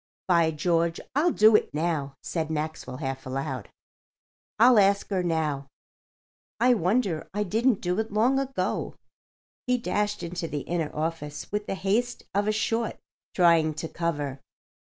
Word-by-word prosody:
"By 170 Hz, -3 st, +4 dB
George, 165 Hz, +1 st, 0 dB, 0.2 s
I'll 310 Hz, +5 st, +4 dB
do 215 Hz, -3 st, +6 dB
it -, -, +1 dB
now," 150 Hz, -4 st, -1 dB
said 160 Hz, -2 st, -2 dB
Maxwell, 155 Hz, -4 st, -4 dB
half 135 Hz, -2 st, -4 dB
aloud. 130 Hz, -3 st, -4 dB, 0.9 s
"I'll 235 Hz, +1 st, +7 dB
ask 200 Hz, 0 st, +3 dB
her 190 Hz, -2 st, +1 dB
now. 155 Hz, -5 st, -1 dB, 0.9 s
I 250 Hz, +2 st, +5 dB
wonder 190 Hz, -4 st, 0 dB
I 210 Hz, -, +1 dB
didn't 225 Hz, +3 st, +1 dB
do 180 Hz, +3 st, -1 dB
it 220 Hz, -1 st, -2 dB
long 240 Hz, +6 st, +3 dB
ago." 270 Hz, 0 st, -2 dB, 0.7 s
He 250 Hz, 0 st, +3 dB
dashed 210 Hz, -1 st, -1 dB
into 170 Hz, 0 st, -4 dB
the 145 Hz, -2 st, -3 dB
inner 165 Hz, -1 st, -2 dB
office 155 Hz, -1 st, -4 dB
with 210 Hz, 0 st, -2 dB
the -, -, -2 dB
haste 205 Hz, +6 st, -1 dB
of 205 Hz, +2 st, +1 dB
a -, -, +3 dB
short 225 Hz, +2 st, -1 dB, 0.4 s
trying 165 Hz, -3 st, +4 dB
to 160 Hz, +2 st, -4 dB
cover. 145 Hz, -5 st, -3 dB
175 Hz, 150 wpm, -26 LUFS, 155-210 Hz, 0.9 s, I'll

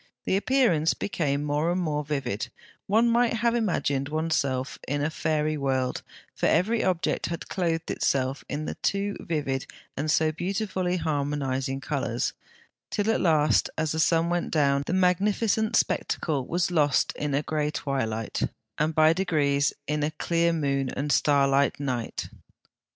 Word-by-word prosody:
The -, -, +1 dB
appearance 195 Hz, -, +2 dB
became 145 Hz, -7 st, -1 dB
more 150 Hz, +3 st, 0 dB
and 180 Hz, -, 0 dB
more 150 Hz, -4 st, -1 dB
vivid: 140 Hz, -8 st, -3 dB, 0.4 s
one 225 Hz, +4 st, +4 dB
might 235 Hz, 0 st, +3 dB
have 230 Hz, +1 st, +1 dB
imagined 145 Hz, -, 0 dB
oneself 145 Hz, -4 st, -1 dB
in 145 Hz, +1 st, -1 dB
a 155 Hz, -, 0 dB
fairy 155 Hz, -1 st, 0 dB
world, 130 Hz, -2 st, -1 dB, 0.3 s
for -, -, 0 dB
every 220 Hz, +7 st, +2 dB
object 180 Hz, -3 st, 0 dB
had 170 Hz, -1 st, -5 dB
clothed 165 Hz, -3 st, -1 dB
itself 135 Hz, 0 st, 0 dB
in 150 Hz, +1 st, -3 dB
the -, -, -3 dB
two 200 Hz, +1 st, 0 dB
vivid 140 Hz, -5 st, -2 dB, 0.3 s
and 150 Hz, +3 st, -2 dB
so 155 Hz, +1 st, +3 dB
beautifully 185 Hz, +1 st, -2 dB
harmonising 140 Hz, -4 st, -1 dB
colours, 130 Hz, -5 st, -2 dB, 0.6 s
till 210 Hz, +1 st, 0 dB
at -, -, 0 dB
last, 155 Hz, -3 st, +3 dB
as 155 Hz, -1 st, 0 dB
the 160 Hz, -, -2 dB
sun 165 Hz, +1 st, +3 dB
went 175 Hz, 0 st, 0 dB
down, 140 Hz, -3 st, +2 dB
the -, -, -1 dB
magnificent 205 Hz, +4 st, +2 dB
spectacle 145 Hz, -11 st, 0 dB
was 175 Hz, +1 st, 0 dB
lost 150 Hz, -5 st, +2 dB
in 145 Hz, -2 st, -2 dB
a 145 Hz, -, 0 dB
grey 150 Hz, -1 st, -1 dB
twilight, 130 Hz, -7 st, -2 dB, 0.4 s
and 155 Hz, +1 st, +1 dB
by 155 Hz, 0 st, +6 dB
degrees 150 Hz, -6 st, +1 dB
in 150 Hz, +1 st, -1 dB
a 150 Hz, -, +1 dB
clear 170 Hz, +2 st, +1 dB
moon 140 Hz, -4 st, 0 dB
and 145 Hz, +3 st, -2 dB
starlight 140 Hz, -1 st, +3 dB
night. 125 Hz, -5 st, -3 dB
155 Hz, 150 wpm, -26 LUFS, 140-180 Hz, 0.6 s, by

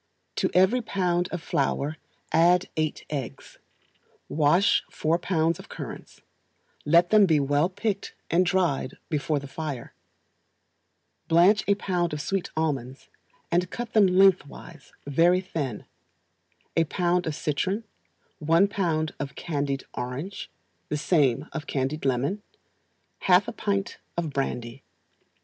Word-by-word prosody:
To -, -, +1 dB
every 190 Hz, +7 st, +4 dB
pound 180 Hz, -5 st, 0 dB
of 175 Hz, -3 st, -4 dB
flour 140 Hz, +2 st, -1 dB, 0.3 s
add 175 Hz, +3 st, +4 dB
eight 155 Hz, -1 st, -2 dB
eggs; 135 Hz, -5 st, -6 dB, 0.7 s
wash 155 Hz, +6 st, +3 dB
four 160 Hz, +2 st, 0 dB
pounds 165 Hz, -2 st, 0 dB
of -, -, -12 dB
currants, -, -, -9 dB, 0.6 s
let 170 Hz, +3 st, +4 dB
them 210 Hz, -2 st, +6 dB
be 155 Hz, -3 st, +4 dB
well 145 Hz, +4 st, +2 dB
picked 205 Hz, +1 st, -3 dB, 0.2 s
and 175 Hz, +3 st, +4 dB
dried 175 Hz, -7 st, 0 dB
before 150 Hz, 0 st, 0 dB
the 140 Hz, -, -5 dB
fire; 140 Hz, -3 st, -6 dB, 1.3 s
blanch 180 Hz, +6 st, +5 dB
a 200 Hz, -, +4 dB
pound 180 Hz, -5 st, -1 dB
of 150 Hz, -, -3 dB
sweet 195 Hz, +2 st, -2 dB
almonds, 135 Hz, -5 st, -2 dB, 0.4 s
and 175 Hz, +1 st, +1 dB
cut 240 Hz, +2 st, -6 dB
them 210 Hz, -3 st, +6 dB
lengthwise 180 Hz, -5 st, +1 dB
very 165 Hz, +6 st, +3 dB
thin; 155 Hz, -, -4 dB, 0.9 s
a 165 Hz, -, +3 dB
pound 175 Hz, +2 st, 0 dB
of 155 Hz, -, -2 dB
citron; 185 Hz, +10 st, -1 dB, 0.6 s
one 165 Hz, +5 st, +4 dB
pound 165 Hz, -6 st, -1 dB
of 140 Hz, -1 st, -5 dB
candied 140 Hz, -4 st, -2 dB
orange; 135 Hz, +11 st, -5 dB, 0.4 s
the 150 Hz, -, -1 dB
same 145 Hz, -6 st, +2 dB
of 155 Hz, -2 st, -5 dB
candied 140 Hz, +3 st, -2 dB
lemon; 135 Hz, +10 st, 0 dB, 0.8 s
half 185 Hz, +3 st, +4 dB
a -, -, -3 dB
pint 200 Hz, -2 st, -2 dB, 0.2 s
of 165 Hz, -3 st, -1 dB
brandy. 125 Hz, -2 st, -3 dB
165 Hz, 125 wpm, -26 LUFS, 145-185 Hz, 1.3 s, them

